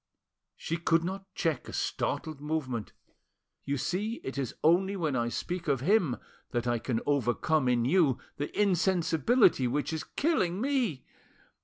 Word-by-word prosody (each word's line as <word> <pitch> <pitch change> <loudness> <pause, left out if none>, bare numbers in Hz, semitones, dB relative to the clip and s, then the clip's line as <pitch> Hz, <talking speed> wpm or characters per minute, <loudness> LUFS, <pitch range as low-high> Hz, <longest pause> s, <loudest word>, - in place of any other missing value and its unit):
She 165 - -3
could 165 0 +2
not 195 +2 -5
check 165 -4 -1
a - - -8
startled 155 -3 -2
movement. 140 -8 -3 0.7
"You 140 0 -1
see 205 - -1
it 135 - -5
is 135 -4 -3
only 190 +5 +4
when 160 -7 -1
I 120 -1 0
speak 175 +7 -4
of 135 -4 +1
him 175 - +2 0.3
that 120 -2 -2
I 120 -1 +1
can 115 -1 -2
overcome 140 +1 +1
in 120 -1 +2
you 150 -3 +3 0.2
the 145 - -2
insensibility 185 - +3
which 145 +5 -1
is 160 - -3
killing 195 - 0
me. 245 - 0
160 Hz, 150 wpm, -29 LUFS, 130-185 Hz, 0.7 s, only